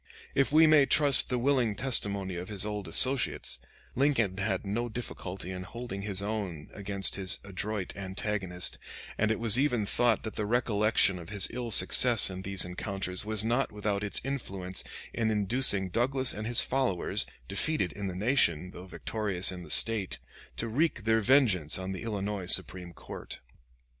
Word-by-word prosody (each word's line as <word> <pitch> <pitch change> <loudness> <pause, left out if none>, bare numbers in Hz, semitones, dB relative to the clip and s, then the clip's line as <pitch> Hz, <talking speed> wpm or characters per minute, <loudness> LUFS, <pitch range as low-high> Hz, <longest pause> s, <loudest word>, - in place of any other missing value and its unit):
If 135 +1 +1
we 160 +2 +6
may 155 -3 +5
trust 145 -2 +4
the 125 - -1
willing 125 -4 0
testimony 100 -6 +1
of 90 +3 -7
his 105 -1 -2
old 105 -3 -5
associates, 130 +9 0 0.3
Lincoln 125 -8 +1
had 95 0 -2
no 115 +5 -3
difficulty 95 -6 -7
in 90 -1 -6
holding 100 +1 -7
his 100 -1 -3
own 100 -8 -5
against 100 -1 -1
his 95 -2 +3
adroit 100 0 -5
antagonist, 95 -2 -3 0.4
and 110 - 0
it 110 - 0
was 115 +1 +2
even 125 -7 0
thought 120 +2 0
that 110 - -6
the 105 -2 -4
recollection 105 -4 +1
of 85 - -11
his 100 -3 +5
ill 120 -1 -5
success 110 +2 +6
in 95 0 -7
these 95 -1 0
encounters 90 0 -5
was 110 0 +1
not 120 +4 0
without 105 -1 -3
its 100 - +1
influence 95 -9 -4 0.3
in 115 -2 -1
inducing 105 -2 +3
Douglas 130 +6 +3
and 110 +1 -6
his 120 -1 +5
followers, 130 -9 0 0.2
defeated 100 - -2
in 100 -1 -5
the 90 - -5
nation, 90 - 0
though 90 +1 -11
victorious 100 -1 -2
in 90 -1 -8
the 85 - -12
State, 105 +3 +4 0.4
to 115 - -3
wreak 140 +1 -1
their 110 +1 +2
vengeance 105 - +2
on 95 0 -5
the 95 - -6
Illinois 105 -4 -4
Supreme 90 -2 0
Court. - - -10
105 Hz, 170 wpm, -28 LUFS, 95-120 Hz, 0.4 s, we